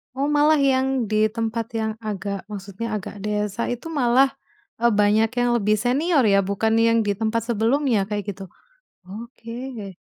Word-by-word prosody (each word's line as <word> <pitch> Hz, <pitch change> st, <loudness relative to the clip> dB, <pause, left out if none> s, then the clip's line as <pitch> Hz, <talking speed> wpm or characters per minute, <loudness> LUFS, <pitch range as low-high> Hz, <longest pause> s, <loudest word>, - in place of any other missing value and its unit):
Oh, 275 Hz, +2 st, 0 dB
malah 295 Hz, +1 st, +4 dB
yang 265 Hz, -2 st, +2 dB
di 215 Hz, 0 st, +3 dB
tempat 225 Hz, 0 st, -3 dB
yang 220 Hz, -1 st, -1 dB
agak 200 Hz, -2 st, -5 dB
maksudnya 205 Hz, +2 st, -5 dB
agak 205 Hz, 0 st, -6 dB
desa 210 Hz, +2 st, -2 dB
itu 245 Hz, +6 st, -4 dB
malah, 265 Hz, -1 st, +3 dB, 0.5 s
eee, 235 Hz, 0 st, +3 dB
banyak 215 Hz, +2 st, +3 dB
yang 245 Hz, 0 st, +2 dB
lebih 210 Hz, 0 st, +2 dB
senior 265 Hz, -, +1 dB
ya, 200 Hz, -2 st, +4 dB
bukan 200 Hz, +3 st, 0 dB
yang 230 Hz, 0 st, +4 dB
di 205 Hz, -, 0 dB
tempat 225 Hz, +1 st, 0 dB
sebelumnya 230 Hz, -2 st, +1 dB
kayak 205 Hz, -1 st, -3 dB
gitu? 195 Hz, +1 st, -10 dB, 0.6 s
Oke. 230 Hz, 0 st, -8 dB
225 Hz, 155 wpm, -23 LUFS, 210-245 Hz, 0.6 s, malah